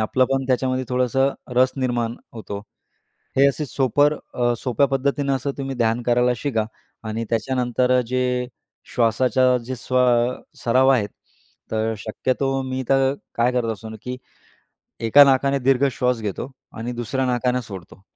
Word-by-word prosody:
आपलं 130 +4 +2
पण 135 0 0
त्याच्यामध्ये 130 0 0
थोडंसं 125 +2 +2 0.3
रस 130 +1 +4
निर्माण 120 -3 -1 0.2
होतो. 105 -2 -6 0.8
हे 140 - +7
असे 150 +2 -2
सोपर 145 +3 +2 0.2
अ, 120 -1 +1
सोप्या 125 +2 +1
पद्धतीनं 140 +1 0
असं 135 +2 -3
तुम्ही 135 -1 -3
ध्यान 115 0 +1
करायला 125 +1 +2
शिका 115 -3 -1 0.4
आणि 110 +1 -3
त्याच्यानंतर 125 +1 0
अ, - - +4
जे 125 0 0 0.5
श्वासाच्या 125 +2 +3
जे 130 0 -4
स्वा 125 +2 +1 0.6
सराव 130 +3 +4
आहेत. 115 -6 +2 0.6
तर 110 0 0
शक्यतो 130 +5 -1
मी 130 0 -3
तर 135 0 +3 0.2
काय 120 +2 +2
करत 120 -3 0
असतो 110 +1 -9
की 125 0 -5 0.9
एका 145 +5 +9
नाकाने 140 0 +3
दीर्घ 135 +1 +3
श्वास 125 -2 0
घेतो 105 +5 -4 0.3
आणि 120 +2 -4
दुसऱ्या 125 +2 -2
नाकाने 125 0 0
सोडतो. 95 -3 -11
125 Hz, 145 wpm, -22 LUFS, 120-135 Hz, 0.9 s, एका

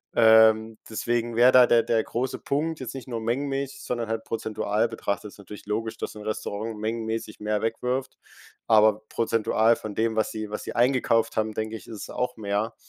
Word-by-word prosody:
Ähm, 110 -1 +5
deswegen 120 +1 -1
wäre 120 +2 +6
da 125 -1 +7
der 115 -1 +4
der 115 -1 +1
große 125 +2 -3
Punkt, 155 +3 -2
jetzt 130 -1 -6
nicht 130 -4 -8
nur 115 -3 -4
mengenmäßig, 135 +3 -2
sondern 120 -2 -3
halt 110 0 -2
prozentual 110 0 -1
betrachtet. 105 -2 -3
Ist - - -17
natürlich 100 +1 -11
logisch, 110 +2 -2
dass - - -5
'n 105 - -9
Restaurant 110 0 -4
mengenmäßig 110 0 -3
mehr 105 0 -1
wegwirft, 125 +4 -2 0.5
aber 110 -1 +4
prozentual 115 0 +2
von 110 -2 -7
dem, 110 +1 0
was 110 -1 0
sie 110 -1 -5
was 105 - -5
sie - - -6
eingekauft 120 -3 +2
haben, 110 0 0
denke 110 +1 -3
ich, 105 - -10
isses 110 -3 -8
auch 125 -1 -3
mehr. 105 +2 -2
115 Hz, 185 wpm, -26 LUFS, 110-120 Hz, 0.5 s, da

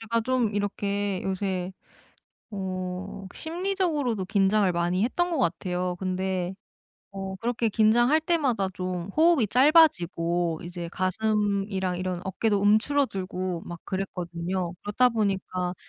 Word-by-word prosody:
제가 230 +1 0
좀 245 -4 0
이렇게 200 -1 -1
요새 190 -1 -2 0.8
어 190 0 -5
심리적으로도 325 - -1
긴장을 195 0 +3
많이 175 +3 +1
했던 350 +9 0
것 330 - -1
같아요. 180 -3 -1
근데 185 -1 -2 0.6
어 195 -1 -5
그렇게 235 +1 -1
긴장할 240 +8 +4
때마다 285 - +1
좀 180 0 -4
호흡이 320 -8 +5
짧아지고 175 - +3
이제 175 0 -6
가슴이랑 195 -1 0
이런 185 -1 -3
어깨도 205 +2 0
움츠러 225 +8 +3
들고 185 -3 -4
막 175 0 -8
그랬거든요. 180 -1 -3
그렇다 230 +5 +3
보니까 190 -4 -1
195 Hz, 280 characters per minute, -26 LUFS, 185-230 Hz, 0.8 s, 호흡이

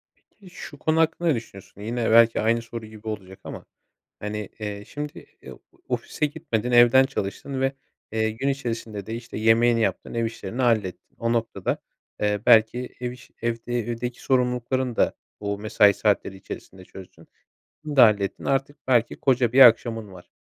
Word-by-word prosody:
Peki, 195 -3 -20
şu 145 -4 -10
konu 160 +1 +1
hakkında 165 +1 +1
ne 150 - +4
düşünüyorsun? 100 -3 -9
Yine 115 +2 -2
belki 115 0 +6
aynı 115 +2 +1
soru 115 -1 -8
gibi 110 0 -11
olacak 95 -3 -6
ama, - - -8 0.6
hani, 105 -1 -4
eee, 105 -1 -5
şimdi, 150 0 -7 0.2
eee, - - -10 0.4
ofise 150 - -1
gitmedin 140 -6 -3
evden 120 +2 +7
çalıştın 135 +2 -4
ve, 135 +1 +1 0.4
eee, 110 0 +1
gün 130 +6 -2
içerisinde 115 -6 -4
de, 110 - -4
işte, 115 0 -8
yemeğini 115 +1 +4
yaptın, 100 +2 -2
ev 115 0 0
işlerini 115 +2 -4
hallettin. 110 -6 0
O 115 0 0
noktada, 115 -1 -1 0.4
eee, 105 -1 +1
belki, 120 +1 +4
ev 125 -1 -2
işi, 125 +1 -16
evde 120 +1 -2
evdeki 120 +1 -4
sorumluluklarını 125 -1 0
da - - +2 0.3
o 100 0 -3
mesai 105 -1 +4
saatleri 100 -2 0
içerisinde 95 0 -10
çözdün. 95 -1 -14 0.6
Bunu 150 -2 -5
da 130 - +8
hallettin 100 -3 +1
artık 135 +2 0
belki 120 -2 +2
koca 125 -3 +2
bir 135 - +5
akşamın 115 -4 +5
var. 90 -1 -14
115 Hz, 165 wpm, -24 LUFS, 105-125 Hz, 0.6 s, da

